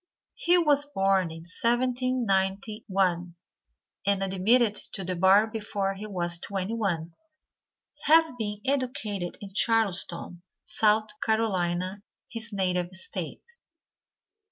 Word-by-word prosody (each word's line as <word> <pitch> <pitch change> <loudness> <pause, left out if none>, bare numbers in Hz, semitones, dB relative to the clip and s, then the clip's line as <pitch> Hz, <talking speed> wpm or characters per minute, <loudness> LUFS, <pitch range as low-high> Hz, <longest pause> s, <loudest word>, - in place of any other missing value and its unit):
He 360 -8 +3
was 295 -4 +3
born 195 - +2
in 160 0 -9
1791, 200 -5 0 0.7
and 200 -1 +2
admitted 205 +4 +3 0.2
to 195 - -3
the 185 0 -3
bar 190 +4 +5
before 210 -3 -3
he 205 +2 -8
was 175 -3 +1
twenty 195 +2 -4
one, 175 -7 -2 0.9
having 320 -1 +5
been 210 -3 -4
educated 245 -9 -2
in 195 -1 -9
Charleston, 190 -6 +2 0.2
South 215 0 +2
Carolina, 190 -4 0 0.3
his 230 0 -4
native 180 -2 -1
State. 455 - -2
200 Hz, 105 wpm, -27 LUFS, 185-230 Hz, 0.9 s, bar